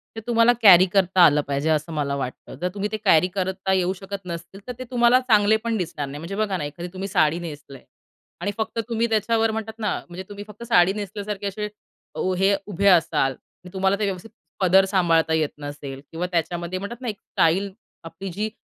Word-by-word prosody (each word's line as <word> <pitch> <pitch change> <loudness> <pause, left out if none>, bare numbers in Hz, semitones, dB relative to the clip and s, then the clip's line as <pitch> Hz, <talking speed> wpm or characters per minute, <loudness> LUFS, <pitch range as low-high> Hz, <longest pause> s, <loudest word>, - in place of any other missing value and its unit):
ते 225 - -4
तुम्हाला 235 0 +4
कॅरी 185 -3 +9
करता 185 -1 +3
आलं 150 -2 +4
पाहिजे, 140 +3 -1
असं 155 +1 0
मला 140 -2 -1
वाटतं. 130 -2 -6
जर 180 - 0
तुम्ही 205 +1 -3
ते 215 - -2
कॅरी 180 -1 +5
करता 190 0 -2
येऊ 185 0 +1
शकत 195 +1 -8
नसतील, 170 +2 -7
तर 250 - -4
ते - - -4
तुम्हाला 240 +1 +5
चांगले 220 -3 +4
पण 230 -1 -1
दिसणार 160 -6 -4
नाही. 145 +2 -7
म्हणजे 175 +5 -6
बघा 205 -3 -1
ना, - - -4
एखादी 170 +5 -6
तुम्ही 190 +1 -4
साडी 165 -3 +2
नेसलीय 145 -5 -9 0.6
आणि 205 - -1
फक्त 220 +1 -3
तुम्ही 230 0 +1
त्याच्यावर 225 +1 +1
म्हणतात 220 0 -4
ना, 210 - 0 0.2
म्हणजे 180 +2 -7
तुम्ही 205 0 -8
फक्त 210 +2 -11
साडी 190 -5 +4
नेसल्यासारखे 205 0 -5
असे 210 +2 -3 0.5
वो 185 - -1
हे 195 +2 +3
उभे 200 0 0
असाल 160 -6 +4
आणि 180 +7 -16
तुम्हाला 190 +1 +1
ते 210 - +1
व्यवस्थित 195 +2 -4 0.3
पदर 190 +1 +5
सांभाळता 165 -4 +2
येत 155 -2 +1
नसेल 145 -2 -7
किंवा 170 +2 -3
त्याच्यामध्ये 170 +2 -2
म्हणतात 230 +5 -7
ना 250 - -5
एक 210 -2 -3
स्टाईल 190 +5 +1 0.3
आपली 190 +4 -7
जी 210 +5 -2
190 Hz, 205 wpm, -23 LUFS, 165-210 Hz, 0.6 s, कॅरी